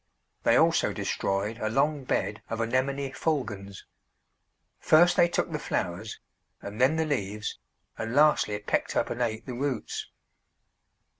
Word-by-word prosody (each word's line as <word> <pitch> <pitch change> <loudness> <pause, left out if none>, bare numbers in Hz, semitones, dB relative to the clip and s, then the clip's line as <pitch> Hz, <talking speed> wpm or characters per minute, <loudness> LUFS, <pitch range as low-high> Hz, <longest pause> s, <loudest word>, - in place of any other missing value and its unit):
They - - +4
also - - +3
destroyed 100 +4 -2
a 110 - -1
long 140 +3 +1
bed 105 -3 -1
of 115 - -3
Anemone 130 +4 0
fulgens. 105 - -3 1.0
First 175 +3 +5
they 170 - +5
took 175 - -1
the - - -2
flowers, - - -3 0.4
and 105 +4 -6
then 135 +5 +5
the 160 0 +1
leaves, 105 -7 -3 0.4
and 115 +2 -3
lastly 145 -8 +4
pecked 105 - -1
up - - 0
and 120 - -3
ate 110 -2 -1
the 130 - -5
roots. 130 -2 -3
125 Hz, 140 wpm, -28 LUFS, 105-145 Hz, 1.0 s, First